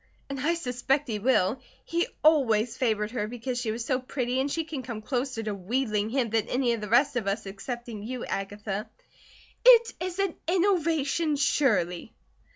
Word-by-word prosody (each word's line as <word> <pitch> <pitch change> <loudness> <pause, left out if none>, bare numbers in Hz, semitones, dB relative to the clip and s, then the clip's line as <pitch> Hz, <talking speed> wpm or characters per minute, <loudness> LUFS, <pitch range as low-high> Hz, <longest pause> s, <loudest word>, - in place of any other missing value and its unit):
And 275 - -4
I 330 +6 +1
suspect 270 -1 0
he 215 -3 -2
will. 245 0 +2 0.2
He 340 +1 0 0.2
always 245 -7 +4
favoured 220 -4 0
her 220 -4 -2
because 245 +2 -4
she 225 - -1
was 230 +1 -4
so 255 0 +1
pretty, 255 -1 -2
and 280 +1 -1
she 330 - 0
can 305 -4 -5
come 230 -3 -6
closer 250 -1 -2
to 215 -1 -2
wheedling 210 +2 -1
him 245 -2 0
than 225 -2 +1
any 250 -2 +1
of 230 - -4
the 210 - -5
rest 260 +4 +4
of 220 -5 -2
us 195 +1 -1
excepting 225 +3 -6
you, 245 +3 -5
Agatha." 205 +1 -4 0.7
"It 475 -2 +7
is 360 0 -4
an 390 -3 0
innovation, 335 -4 +2
surely!" 220 - +1
250 Hz, 175 wpm, -27 LUFS, 215-285 Hz, 0.7 s, It